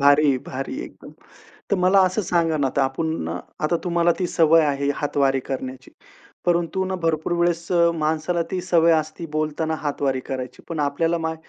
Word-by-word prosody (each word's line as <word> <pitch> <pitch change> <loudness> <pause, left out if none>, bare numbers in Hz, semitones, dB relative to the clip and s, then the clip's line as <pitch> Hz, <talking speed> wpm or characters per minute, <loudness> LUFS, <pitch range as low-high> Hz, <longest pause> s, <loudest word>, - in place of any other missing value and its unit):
भारी, 145 -1 +5
भारी 135 - -6
आहे, 335 - -4
एकदम. - - -13 0.6
तर 200 - +3
मला 185 +2 +4
असं 185 +4 -1
सांगा 165 -3 +1
ना, 140 -2 +1
आता 135 +1 0
आपण 135 - -2 0.3
आता 155 +3 +1
तुम्हाला 170 -1 +2
ती 180 - 0
सवय 165 -1 +4
आहे 140 -1 0
हातवारी 140 -2 +1
करण्याची. 130 0 -6 0.6
परंतु 175 +2 +1
ना 190 0 -3
भरपूर 160 0 0
वेळेस 170 -1 +1
अ, 170 -1 +4
माणसाला 160 +2 0
ती 185 - -1
सवय 170 -2 +4
असती 155 +1 -1
बोलताना 155 +1 -1
हातवारे 140 -3 -1
करायची. 130 -2 -6
पण 160 -3 -3
आपल्याला 165 +4 0
मा 160 0 -2
160 Hz, 170 wpm, -23 LUFS, 140-170 Hz, 0.6 s, भारी